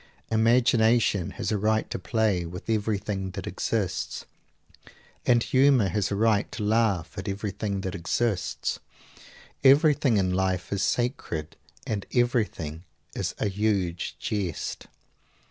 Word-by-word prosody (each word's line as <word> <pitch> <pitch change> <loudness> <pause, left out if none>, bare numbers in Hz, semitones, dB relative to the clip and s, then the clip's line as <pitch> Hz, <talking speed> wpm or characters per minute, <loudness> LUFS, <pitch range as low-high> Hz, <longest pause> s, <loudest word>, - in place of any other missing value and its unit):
Imagination 115 -3 +3
has - - -2
a 105 - 0
right 110 +1 +1
to - - -3
play 105 -2 +1
with 85 +1 -8
everything 105 -3 -1
that - - -4
exists; - - -2 1.0
and 120 -2 +4
humor 130 -6 +4
has 100 +3 0
a 100 - -1
right 105 0 +2
to - - -4
laugh 105 -6 +1
at 95 - -6
everything 100 0 -3
that 95 -1 -4
exists. 95 +3 -1 0.8
Everything 140 -3 +5
in 95 -2 +1
life 95 0 -1
is 100 - -1
sacred 100 - -2 0.3
and 105 -3 -3
everything 105 -10 0 0.3
is - - -3
a - - 0
huge 100 -4 -1
jest. 95 -7 -3
105 Hz, 125 wpm, -26 LUFS, 95-115 Hz, 1.0 s, Everything